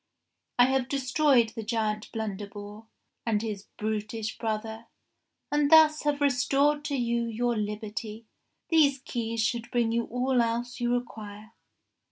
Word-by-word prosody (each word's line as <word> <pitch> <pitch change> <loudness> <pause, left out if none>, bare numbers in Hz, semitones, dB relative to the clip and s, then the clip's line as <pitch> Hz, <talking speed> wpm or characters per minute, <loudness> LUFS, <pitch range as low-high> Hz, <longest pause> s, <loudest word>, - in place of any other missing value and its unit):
I 245 - +7
have 265 -1 0
destroyed 270 -3 +3
the 225 +1 -7
giant 215 -1 -2
Blunderbore 205 0 -6 0.4
and 220 -3 +1
his 210 -2 -5
brutish 215 +1 -3
brother, 220 0 -3 0.6
and 295 -1 +2
thus 315 -1 +7
have 290 -1 +1
restored 280 +2 +2
to 285 - -1
you 235 -2 0
your 235 +1 -1
liberty. 215 +1 -4 0.4
These 300 -5 +4
keys 230 -3 -3
should 240 +2 -1
bring 240 -3 +1
you 235 0 0
all 250 +1 +1
else 235 +2 -2
you 240 0 0
require." 220 -3 -5
235 Hz, 135 wpm, -28 LUFS, 220-260 Hz, 0.6 s, I